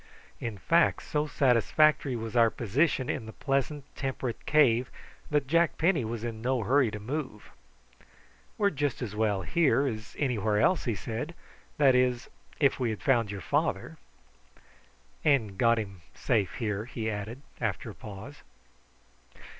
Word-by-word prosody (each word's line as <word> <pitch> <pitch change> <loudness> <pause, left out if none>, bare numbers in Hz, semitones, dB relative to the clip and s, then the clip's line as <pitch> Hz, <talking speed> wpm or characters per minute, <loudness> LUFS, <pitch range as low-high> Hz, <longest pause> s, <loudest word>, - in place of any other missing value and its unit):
In 115 -3 -4
fact 165 - +2
so 150 0 -1
satisfactory 140 +2 +3
was 115 -1 -5
our 115 -1 +6
position 130 - 0
in 110 - -3
the 110 - -8
pleasant 140 +1 -1
temperate 130 -3 -4
cave 130 -5 +4 0.4
that 150 -2 +1
Jack 165 +3 +2
Penny 165 -5 +2
was 115 0 -4
in 115 -2 -5
no 125 -1 0
hurry 130 +3 +3
to 105 - -6
move. 130 -1 -5 1.1
"We're 200 -1 +2
just 145 -4 -2
as 105 -3 -5
well 105 -3 0
here 145 - +2
as 110 -4 -5
anywhere 110 -7 0
else," 180 - +2
he 115 -4 0
said; 120 +11 -5 0.4
"that 140 -3 +5
is, 125 0 +1 0.3
if 140 -3 +3
we 125 -3 0
had 110 - -5
found 120 -5 +2
your 100 -1 -5
father." - - -1 1.3
"And 125 -10 +2
got 115 +3 +3
him 100 -5 -5
safe 105 -7 0
here," 105 -2 -2
he 115 -2 -5
added 110 +5 -5 0.2
after - - -2
a - - -11
pause. 110 +8 -10
125 Hz, 150 wpm, -29 LUFS, 110-145 Hz, 1.3 s, our